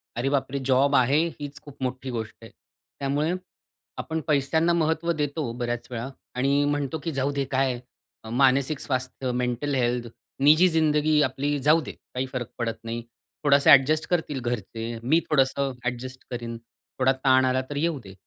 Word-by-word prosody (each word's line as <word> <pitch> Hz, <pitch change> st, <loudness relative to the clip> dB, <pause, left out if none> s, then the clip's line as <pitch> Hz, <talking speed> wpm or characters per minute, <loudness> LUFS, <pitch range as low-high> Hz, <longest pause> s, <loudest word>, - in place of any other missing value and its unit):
"अरे 125 Hz, +3 st, 0 dB
बाप 140 Hz, -2 st, 0 dB
रे! 140 Hz, -, -2 dB
जॉब 135 Hz, +2 st, +3 dB
आहे 130 Hz, +4 st, +4 dB, 0.2 s
हीच 145 Hz, -1 st, -7 dB
खूप 145 Hz, -2 st, -14 dB
मोठी 130 Hz, +1 st, -3 dB
गोष्ट 110 Hz, -2 st, -5 dB
आहे." 115 Hz, -, -12 dB, 0.5 s
त्यामुळे 145 Hz, +4 st, 0 dB, 0.6 s
आपण 160 Hz, -1 st, -3 dB
पैशांना 155 Hz, +3 st, +2 dB
महत्त्व 160 Hz, 0 st, +1 dB
देतो 150 Hz, -4 st, -2 dB
बऱ्याच 120 Hz, -1 st, -3 dB
वेळा 120 Hz, +2 st, -4 dB, 0.3 s
आणि 140 Hz, +3 st, +2 dB
म्हणतो 145 Hz, +1 st, -1 dB
की 165 Hz, -, -2 dB
"जाऊदे, 140 Hz, 0 st, -1 dB
काय 130 Hz, -2 st, +1 dB, 0.5 s
मानसिक 135 Hz, +3 st, +3 dB
स्वास्थ्य, 130 Hz, 0 st, -3 dB
मेंटल 125 Hz, +3 st, -1 dB
हेल्थ, 120 Hz, -1 st, 0 dB, 0.4 s
निजी 155 Hz, +5 st, +7 dB
जिंदगी 155 Hz, -1 st, +3 dB
आपली 145 Hz, +2 st, -1 dB
जाऊदे, 150 Hz, +3 st, +3 dB
काही 130 Hz, +1 st, -6 dB
फरक 125 Hz, -3 st, -3 dB
पडत 115 Hz, -1 st, -2 dB
नाही. 115 Hz, +1 st, -4 dB, 0.4 s
थोडासा 140 Hz, -1 st, +5 dB
ॲडजस्ट 155 Hz, +4 st, +1 dB
करतील 160 Hz, -6 st, 0 dB
घरचे, 115 Hz, -1 st, -4 dB, 0.2 s
मी 155 Hz, +7 st, +4 dB
थोडंसं 135 Hz, -2 st, +2 dB
ॲडजस्ट 130 Hz, +1 st, -4 dB
करीन, 120 Hz, -1 st, -4 dB, 0.4 s
थोडा 130 Hz, 0 st, +4 dB
ताण 130 Hz, 0 st, +5 dB
आला 130 Hz, 0 st, +2 dB
तर 145 Hz, -, -5 dB
येऊ 165 Hz, -1 st, 0 dB
दे." 95 Hz, -1 st, -11 dB
135 Hz, 160 wpm, -25 LUFS, 125-150 Hz, 0.6 s, निजी